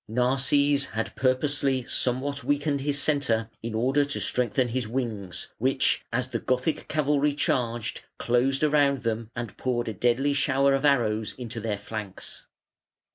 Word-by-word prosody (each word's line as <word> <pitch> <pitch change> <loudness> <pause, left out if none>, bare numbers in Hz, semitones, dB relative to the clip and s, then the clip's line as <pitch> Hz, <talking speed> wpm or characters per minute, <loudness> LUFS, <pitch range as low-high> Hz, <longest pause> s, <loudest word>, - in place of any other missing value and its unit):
Narses 135 +4 +2
had 115 - -2
purposely 135 0 +1
somewhat 130 +4 -1
weakened 145 +1 0
his 145 0 0
centre 120 -7 0
in 115 -1 -4
order 135 +6 +2
to 145 0 -2
strengthen 125 +1 +1
his 125 -1 -2
wings, 110 -6 -4
which, 130 +3 +2
as 125 +2 -1
the - - -2
Gothic 130 +5 -1
cavalry 150 -1 +1
charged, 120 -5 -1 0.2
closed 130 +4 +1
round 145 -3 +3
them 115 -1 -2
and 120 -2 -5
poured 120 -2 -1
a 110 - -2
deadly 125 +7 +1
shower 140 -1 +3
of 135 +2 +1
arrows 110 -6 +2
into 120 -2 -6
their 110 -2 -2
flanks. 100 -1 -7
130 Hz, 145 wpm, -26 LUFS, 115-140 Hz, 0.2 s, round